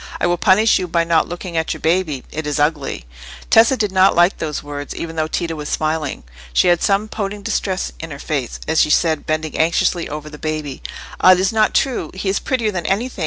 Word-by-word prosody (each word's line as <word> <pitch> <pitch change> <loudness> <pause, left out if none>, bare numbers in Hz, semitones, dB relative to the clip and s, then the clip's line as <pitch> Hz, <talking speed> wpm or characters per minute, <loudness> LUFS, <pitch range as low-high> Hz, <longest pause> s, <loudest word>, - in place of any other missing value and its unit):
I - - +1
will 175 0 +1
punish 215 +4 +4
you 180 - -3
by 170 0 +1
not 165 -1 +2
looking 175 0 -6
at 160 0 -1
your - - -9
baby; 160 -5 0
it 155 0 -4
is 150 0 -1
ugly." 145 - -1 0.5
Tessa 230 +4 +6
did 210 -4 0
not 190 0 +4
like 175 +3 +3
those 150 -2 -3
words, 145 -1 -6
even 165 -1 -5
though 155 -1 0
Tito 165 +1 -2
was 150 -2 -6
smiling. 155 - -2 0.3
She 65 - +4
had 175 -1 +3
some 200 +2 +1
pouting 205 -1 -5
distress 190 -2 -2
in 165 - -7
her 140 - -7
face, 140 -4 -3
as 160 0 +3
she - - +2
said, 160 0 +1
bending 155 0 -2
anxiously 170 +1 +1
over 150 0 -6
the 150 -1 -10
baby— 155 -3 -4 0.4
"Ah, 185 - +7
it 180 - +1
is 190 +3 +1
not 215 -1 +2
true! 250 - 0
He 190 +1 -2
is 195 - +1
prettier 235 -5 -1
than 175 -4 -3
anything. 225 +4 -1
165 Hz, 225 wpm, -19 LUFS, 155-190 Hz, 0.5 s, Ah